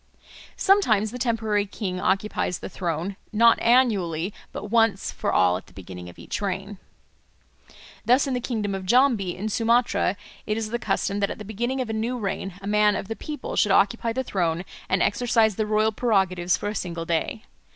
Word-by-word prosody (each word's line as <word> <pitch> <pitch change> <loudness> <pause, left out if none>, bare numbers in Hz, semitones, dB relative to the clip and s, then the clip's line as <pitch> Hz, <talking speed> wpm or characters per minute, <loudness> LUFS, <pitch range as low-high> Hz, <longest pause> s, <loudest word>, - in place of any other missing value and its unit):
Sometimes 220 - +3
the 250 - -7
temporary 220 -4 0
king 190 -3 -4
occupies 190 -2 0
the - - -7
throne, 175 +2 -3
not 230 +1 +5
annually, 205 -8 +2 0.2
but 210 - -7
once 225 -4 +2
for - - -2
all 90 -1 +3
at 95 - -12
the - - -19
beginning 90 -1 -9
of 85 - -14
each - - -5
reign. 195 0 -4 1.2
Thus 250 +4 +4
in 270 - -2
the 250 - 0
kingdom 215 -5 -2
of 190 -1 -5
Jambi 235 -6 +3
in 205 +3 -3
Sumatra 230 -2 +1 0.3
it 215 0 0
is 220 -1 -3
the 240 - -1
custom 200 -4 -1
that 200 - +1
at - - -5
the 210 - -9
beginning 240 +6 -2
of 245 - -4
a - - -3
new 230 +3 -1
reign 195 -3 -4
a - - -5
man 210 0 +3
of 195 - -5
the 225 - -3
people 300 +4 -6
should 210 - +3
occupy 220 +4 +3
the 260 +3 -2
throne 175 -5 -1 0.2
and 185 0 +2
exercise 225 -2 +2
the 215 +1 -1
royal 215 +1 +2
prerogatives 190 -6 +1
for - - -4
a - - -3
single 170 -5 -4
day. 170 +6 -2
210 Hz, 195 wpm, -25 LUFS, 185-230 Hz, 1.2 s, not